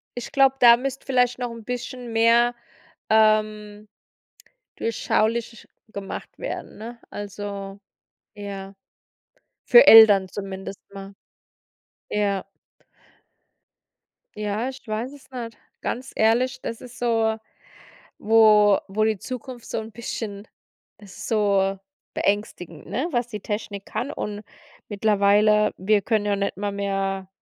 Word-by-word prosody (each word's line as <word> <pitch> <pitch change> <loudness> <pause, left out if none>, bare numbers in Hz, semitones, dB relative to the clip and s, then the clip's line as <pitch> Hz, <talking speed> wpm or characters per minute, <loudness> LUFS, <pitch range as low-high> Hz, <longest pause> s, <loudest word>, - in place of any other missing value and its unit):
ich 245 - -6
glaube, 270 -1 +4
da 235 -1 +8
müsste 270 +1 -5
vielleicht 250 -1 +1
noch 245 -1 -3
'n 230 -1 -10
bisschen 245 0 -6
mehr, 235 +2 +4 0.5
ähm, 215 -1 +2 0.9
durchschaubar 230 0 -1 0.2
gemacht 200 -2 -7
werden, - - -6
ne? 235 +2 -9
Also, 200 -1 -7 0.6
ja, 200 -1 -7 0.9
für 485 - +8
Eltern 210 -4 +9
zumindest 195 -1 -7
mal. 195 0 -9 1.0
Ja. 200 -2 -1 1.9
Ja, 210 +4 -2
ich 265 0 -10
weiß 220 +5 -3
es 285 -2 -16
nicht. 235 -3 -7 0.2
Ganz 255 +2 -4
ehrlich, 245 +3 +2
das 230 - -5
ist 250 0 -12
so, 225 -2 +1 0.8
wo 210 -2 +5
wo 210 +2 0
die 220 -1 +1
Zukunft 245 +2 -8
so - - -3
'n 220 0 -10
bisschen 215 -3 -6 0.6
so 195 -1 0 0.4
beängstigend 180 -6 -2
ne, 270 +10 -2
was 240 -1 0
die 210 -3 -6
Technik 205 -1 -5
kann. 270 - -4
Und 210 -7 -5 0.5
mittlerweile, 210 0 +3
wir 205 +2 +2
können 215 -1 0
ja 205 -1 +1
nicht 200 -2 -2
mal 205 0 -2
mehr, 195 -1 -2
215 Hz, 115 wpm, -23 LUFS, 200-235 Hz, 1.9 s, Eltern